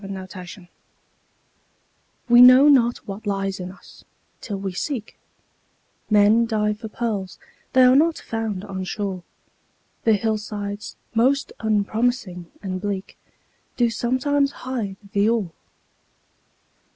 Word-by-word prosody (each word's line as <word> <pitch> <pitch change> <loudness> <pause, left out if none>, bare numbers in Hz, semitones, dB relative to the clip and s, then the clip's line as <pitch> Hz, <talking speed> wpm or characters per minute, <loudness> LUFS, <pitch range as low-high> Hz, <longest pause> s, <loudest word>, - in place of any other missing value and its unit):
HIDDEN 195 -1 -7
GEMS 185 +2 -9 1.7
We 240 0 +7
know 255 +3 +9
not 240 -4 +4
what 205 +2 -7
lies 195 -1 -2
in 180 0 -6
us, 195 - -17 0.4
till 205 -4 -5
we 195 -1 -4
seek; 230 - -4 0.9
Men 215 +2 +4
dive 210 -2 0
for 220 - -6
pearls—they 220 +3 -2
are 255 +1 +6
not 320 +3 +3
found 220 -4 -4
on 190 -2 -5
shore, 190 -1 -4 0.8
The 225 - +4
hillsides 210 -1 -3 0.2
most 265 +5 +1
unpromising 215 -3 -1
and 185 -2 -4
bleak 200 -2 -4 0.6
Do 240 -2 +2
sometimes 275 +5 0
hide 230 -7 -4
the 205 0 +2
ore. 220 -7 0
215 Hz, 115 wpm, -22 LUFS, 195-240 Hz, 1.7 s, know